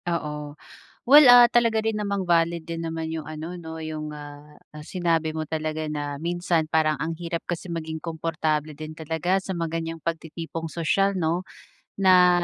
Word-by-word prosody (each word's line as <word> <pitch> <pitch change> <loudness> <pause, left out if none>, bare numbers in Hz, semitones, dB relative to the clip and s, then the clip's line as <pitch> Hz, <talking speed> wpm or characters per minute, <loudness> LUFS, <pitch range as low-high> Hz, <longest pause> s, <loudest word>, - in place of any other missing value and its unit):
Oo. 150 -3 -4 0.5
Well, 295 +3 +10
ah, 245 -1 +9
talaga 230 -2 +3
rin 220 0 -1
namang 200 -3 -2
valid 170 -1 +2
din 165 0 -4
naman 160 0 -3
'yong 160 -1 -4
ano, 155 +3 -6
'no, 160 -2 -8
'yong, 155 -1 -5
ah 150 0 -11 0.2
ah, 150 - -9
sinabi 165 -2 0
mo 155 -1 -4
talaga 155 0 -3
na 145 -1 -4
minsan 170 -1 0
parang 155 -1 +1
ang 165 +1 -2
hirap 170 0 -4
kasi 175 0 -4
maging 160 -1 -4
komportable 155 -2 -2
din 155 +1 -7
talaga 160 +4 -1
sa 190 -1 -5
mga 165 -1 -2
ganiyang 165 -1 -6
pagtitipong 165 0 -4
sosyal, 190 +5 +1
'no. 175 +1 -1 0.5
Na 180 -2 +5
165 Hz, 170 wpm, -25 LUFS, 155-175 Hz, 0.5 s, Well